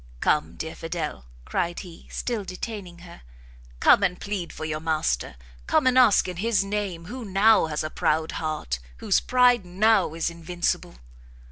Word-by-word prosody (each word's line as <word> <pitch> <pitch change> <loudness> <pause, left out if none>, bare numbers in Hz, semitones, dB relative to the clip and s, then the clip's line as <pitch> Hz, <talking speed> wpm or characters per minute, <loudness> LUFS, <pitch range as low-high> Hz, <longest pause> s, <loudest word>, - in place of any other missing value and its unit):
"Come, 150 - +1
dear 160 0 -5
Fidel!" 165 - -5 0.2
cried 175 0 -2
he, 175 -3 -13
still 235 -4 -3
detaining 185 -2 -7
her, 170 - -13 0.6
"come - - +6
and 180 -2 0
plead 200 -4 -4
for 155 - -6
your 155 -1 -2
master! 155 - -1 0.3
come - - +3
and 255 -1 +4
ask 250 -8 +5
in 180 -1 -5
his 205 0 +1
name 195 -4 -3
who 245 +6 -7
now 205 -1 +4
has 150 -1 -2
a 155 - -4
proud 160 +1 0
heart, 155 - -3 0.2
whose - - +2
pride 250 -3 +4
now 190 -1 +2
is 165 0 -1
invincible!" 170 - -2
180 Hz, 160 wpm, -25 LUFS, 160-210 Hz, 0.6 s, come